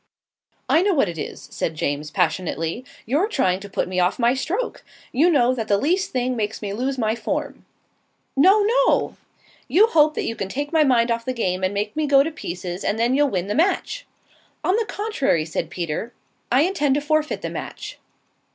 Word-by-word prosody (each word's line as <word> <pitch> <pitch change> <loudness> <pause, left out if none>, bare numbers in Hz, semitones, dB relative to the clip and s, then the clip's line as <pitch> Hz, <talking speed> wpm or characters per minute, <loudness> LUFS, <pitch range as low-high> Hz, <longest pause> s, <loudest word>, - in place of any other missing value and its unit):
"I 325 - +4
know 390 -1 +2
what 270 - +2
it 165 -2 -6
is," - - -7
said 160 - -3
James, 150 0 -2
passionately. 165 +6 -1 0.2
"You're 295 - +1
trying 190 - +1
to 200 +1 -10
put - - -1
me 185 0 -2
off 180 0 +2
my 240 0 +3
stroke. 375 - -3 0.3
You 310 +8 +3
know 255 -6 +3
that 225 -4 -3
the 200 - +3
least 355 - +1
thing 255 0 -1
makes 220 -1 -2
me 200 -2 -4
lose 260 +5 -2
my 220 -3 +1
form." - - -4 0.7
"No, 380 +10 +6
no!" - - +2 0.5
"You 405 +5 +5
hope 310 -8 +3
that - - -2
you 230 - -2
can 195 -3 -4
take 290 +7 -4
my 320 -1 +5
mind 240 -4 +3
off 230 0 -1
the 255 - -2
game 190 -6 -1
and 185 - +1
make 210 +2 -3
me 310 -1 0
go 275 -1 +6
to 320 - -3
pieces, 180 - -6
and 210 - 0
then 235 +2 +2
you'll 290 +1 +3
win 185 -5 -1
the 205 - -2
match." 395 - 0 0.6
"On 370 - +2
the 450 0 +1
contrary," 285 - 0
said 160 0 -3
Peter. 175 +7 -4 0.4
"I 255 +3 +5
intend 295 -6 +1
to 290 - 0
forfeit 310 +1 0
the - - -3
match." - - -7
255 Hz, 205 wpm, -22 LUFS, 200-310 Hz, 0.7 s, No